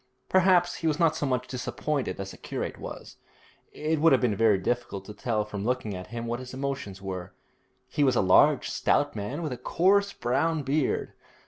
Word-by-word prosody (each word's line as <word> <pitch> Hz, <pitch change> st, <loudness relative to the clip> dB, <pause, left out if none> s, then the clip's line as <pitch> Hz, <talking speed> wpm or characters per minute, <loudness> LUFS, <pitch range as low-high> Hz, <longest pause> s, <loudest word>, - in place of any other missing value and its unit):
Perhaps 180 Hz, -1 st, +4 dB
he 165 Hz, -, -2 dB
was 155 Hz, -, +1 dB
not 165 Hz, -2 st, +3 dB
so 145 Hz, -, -1 dB
much 130 Hz, -1 st, -1 dB
disappointed 135 Hz, +2 st, -3 dB
as 95 Hz, 0 st, -5 dB
the -, -, -12 dB
curate -, -, -5 dB
was. -, -, -9 dB, 0.5 s
It 155 Hz, 0 st, -1 dB
would 165 Hz, -2 st, +6 dB
have 130 Hz, -, +4 dB
been 120 Hz, -5 st, +2 dB
very 110 Hz, -1 st, +4 dB
difficult 100 Hz, -1 st, -2 dB
to 105 Hz, -, -8 dB
tell 110 Hz, -2 st, -1 dB
from 100 Hz, -2 st, -5 dB
looking 120 Hz, -3 st, -1 dB
at 90 Hz, 0 st, -7 dB
him 115 Hz, +1 st, -5 dB
what 120 Hz, +1 st, -2 dB
his 130 Hz, 0 st, -8 dB
emotions 135 Hz, -8 st, -4 dB
were. 95 Hz, -1 st, -6 dB, 0.5 s
He 145 Hz, -, 0 dB
was 130 Hz, -2 st, +3 dB
a 125 Hz, +9 st, +5 dB
stout -, -, +1 dB
large 145 Hz, -3 st, -2 dB
man 120 Hz, +10 st, -4 dB
with 155 Hz, -, -3 dB
a 125 Hz, -, -4 dB
coarse 200 Hz, +10 st, +2 dB
brown 145 Hz, +5 st, 0 dB
beard. 140 Hz, +1 st, 0 dB
125 Hz, 200 wpm, -27 LUFS, 105-150 Hz, 0.5 s, would